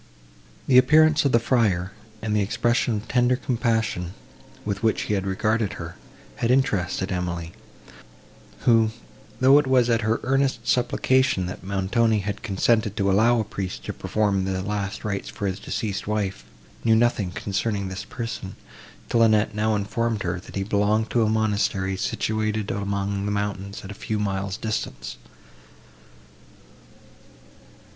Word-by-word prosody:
The 125 Hz, -2 st, +7 dB
appearance 155 Hz, +2 st, +5 dB
of 140 Hz, -, +3 dB
the 115 Hz, -, +5 dB
friar 105 Hz, -7 st, +1 dB, 0.3 s
and 105 Hz, -1 st, 0 dB
the 105 Hz, -, +3 dB
expression 120 Hz, +4 st, +1 dB
of 105 Hz, +1 st, -5 dB
tender 125 Hz, 0 st, +3 dB
compassion, 115 Hz, -8 st, -1 dB, 0.5 s
with 100 Hz, -2 st, -2 dB
which 115 Hz, -1 st, +1 dB
he -, -, -2 dB
had 100 Hz, -1 st, -1 dB
regarded 105 Hz, +2 st, 0 dB
her, 85 Hz, -1 st, -7 dB, 0.4 s
had 115 Hz, -, 0 dB
interested 100 Hz, -8 st, +1 dB
Emily, 85 Hz, -2 st, -3 dB, 1.1 s
who, 115 Hz, -2 st, +4 dB, 0.5 s
though 135 Hz, +3 st, +7 dB
it 145 Hz, -, -1 dB
was 125 Hz, -2 st, +3 dB
at 115 Hz, 0 st, +2 dB
her 110 Hz, +1 st, +1 dB
earnest 135 Hz, -3 st, 0 dB
supplication, 130 Hz, -3 st, +2 dB
that 90 Hz, -, -7 dB
Montoni 100 Hz, +4 st, +1 dB
had 105 Hz, 0 st, -3 dB
consented 105 Hz, 0 st, +1 dB
to 100 Hz, -1 st, +2 dB
allow 115 Hz, +4 st, +4 dB
a -, -, +1 dB
priest 100 Hz, -3 st, -5 dB
to -, -, -4 dB
perform 100 Hz, -3 st, 0 dB
the 95 Hz, -1 st, -2 dB
last 100 Hz, 0 st, -3 dB
rites 100 Hz, -2 st, -3 dB
for 105 Hz, -, -5 dB
his 95 Hz, -1 st, -2 dB
deceased 100 Hz, -3 st, -3 dB
wife, 100 Hz, -, -2 dB, 0.4 s
knew 115 Hz, -1 st, +4 dB
nothing 115 Hz, -4 st, +2 dB
concerning 100 Hz, +2 st, -2 dB
this 95 Hz, +1 st, -5 dB
person, 115 Hz, -5 st, -6 dB, 0.5 s
till 115 Hz, -, +2 dB
Annette 110 Hz, -1 st, +4 dB
now 110 Hz, +1 st, +1 dB
informed 110 Hz, +1 st, -1 dB
her, 90 Hz, 0 st, -2 dB
that -, -, -12 dB
he 95 Hz, -, -1 dB
belonged 105 Hz, +2 st, +1 dB
to 120 Hz, -, +2 dB
a 110 Hz, -, +3 dB
monastery, 105 Hz, -3 st, 0 dB
situated 110 Hz, +2 st, -1 dB
among 100 Hz, 0 st, -2 dB
the 105 Hz, -, -1 dB
mountains 100 Hz, -1 st, -3 dB
at 95 Hz, -, -7 dB
a -, -, -5 dB
few 105 Hz, +2 st, -3 dB
miles 100 Hz, -1 st, -2 dB
distance. 110 Hz, -1 st, -4 dB
105 Hz, 150 wpm, -24 LUFS, 95-115 Hz, 1.1 s, The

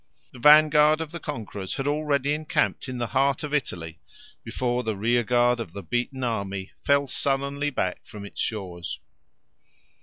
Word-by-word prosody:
The 125 Hz, -, -11 dB
vanguard 150 Hz, +2 st, +6 dB
of 160 Hz, -2 st, -5 dB
the 170 Hz, -, -6 dB
conquerors 110 Hz, -, -5 dB
had 135 Hz, -, -3 dB
already 145 Hz, -1 st, +1 dB
encamped 150 Hz, -3 st, -1 dB
in 130 Hz, -, -4 dB
the 120 Hz, -, -1 dB
heart 135 Hz, +1 st, +2 dB
of 150 Hz, 0 st, -4 dB
Italy 85 Hz, -, -3 dB, 0.4 s
before 125 Hz, -1 st, -1 dB
the 110 Hz, -3 st, -2 dB
rearguard 120 Hz, +2 st, +2 dB
of 100 Hz, -8 st, -6 dB
the 100 Hz, -, -7 dB
beaten 125 Hz, +6 st, -2 dB
army 100 Hz, -5 st, -3 dB
fell 140 Hz, 0 st, +3 dB
sullenly 140 Hz, +2 st, -1 dB
back 95 Hz, -9 st, -2 dB
from 105 Hz, -1 st, -10 dB
its 100 Hz, -, -6 dB
shores. 90 Hz, -6 st, -4 dB
125 Hz, 155 wpm, -25 LUFS, 105-145 Hz, 0.4 s, vanguard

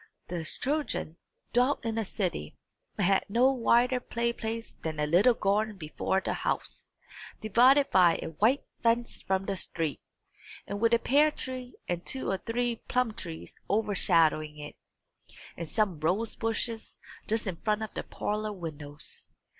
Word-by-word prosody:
The 175 Hz, -2 st, -3 dB
children 270 Hz, -, -2 dB, 0.4 s
dwelt 250 Hz, +2 st, +2 dB
in 225 Hz, 0 st, -1 dB
a 220 Hz, -, -1 dB
city, 180 Hz, -, -3 dB, 0.4 s
and 200 Hz, -, +2 dB
had 195 Hz, +1 st, +4 dB
no 245 Hz, +6 st, +4 dB
wider 250 Hz, 0 st, +3 dB
play 235 Hz, -1 st, -1 dB
place 225 Hz, 0 st, -5 dB
than 155 Hz, -2 st, -3 dB
a 150 Hz, -, +2 dB
little 190 Hz, +11 st, +5 dB
garden 210 Hz, +1 st, +1 dB
before 170 Hz, +3 st, -1 dB
the -, -, -1 dB
house, -, -, -3 dB, 0.5 s
divided 255 Hz, +6 st, +5 dB
by 175 Hz, -3 st, +6 dB
a -, -, -4 dB
white 220 Hz, -, +2 dB, 0.2 s
fence 235 Hz, +1 st, +1 dB
from 190 Hz, 0 st, 0 dB
the 195 Hz, -, -1 dB
street, 165 Hz, -5 st, -2 dB, 0.6 s
and 200 Hz, +1 st, -4 dB
with 230 Hz, 0 st, +5 dB
a -, -, +4 dB
pear 290 Hz, +6 st, +4 dB
tree 255 Hz, -3 st, -5 dB
and 175 Hz, 0 st, -2 dB
two 265 Hz, -, -1 dB
or 190 Hz, -, -1 dB
three 240 Hz, 0 st, -1 dB
plum 250 Hz, -3 st, +1 dB
trees 165 Hz, -6 st, -7 dB
overshadowing 170 Hz, -7 st, +2 dB
it, 150 Hz, 0 st, -8 dB, 0.8 s
and 170 Hz, -2 st, -6 dB
some 200 Hz, -6 st, +1 dB
rose 190 Hz, +9 st, 0 dB
bushes 225 Hz, 0 st, -3 dB, 0.3 s
just 225 Hz, +1 st, 0 dB
in 185 Hz, -4 st, -3 dB
front 215 Hz, +3 st, 0 dB
of 220 Hz, -, -6 dB
the -, -, -3 dB
parlour 210 Hz, 0 st, -3 dB
windows. 155 Hz, -5 st, -6 dB
215 Hz, 155 wpm, -29 LUFS, 175-235 Hz, 0.8 s, by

